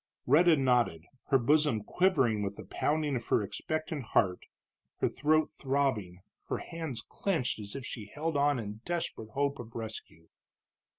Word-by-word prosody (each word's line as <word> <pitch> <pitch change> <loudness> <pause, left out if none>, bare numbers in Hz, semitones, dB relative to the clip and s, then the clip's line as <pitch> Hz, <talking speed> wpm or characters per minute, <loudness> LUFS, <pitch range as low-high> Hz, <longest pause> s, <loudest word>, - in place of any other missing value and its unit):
Rhetta 160 +4 +6
nodded, 120 -11 +2 0.2
her 135 - +5
bosom 140 -3 +3
quivering 130 - +2
with 100 0 -2
the - - -9
pounding 150 -2 0
of 120 - -4
her 105 - +3
expectant 155 +6 -3
heart, 90 -2 +3 0.6
her - - +2
throat 155 +1 +2
throbbing, 130 -11 -1 0.2
her - - -1
hands 160 -8 -5
clenched 165 - -1
as 100 -1 -7
if 135 -2 -5
she 110 -5 -6
held 155 +7 -3
on 145 -1 +3
in 105 -1 -6
desperate 170 -10 -3
hope 140 0 0
of 115 -1 -9
rescue. 110 -7 -7
135 Hz, 155 wpm, -31 LUFS, 110-150 Hz, 0.6 s, Rhetta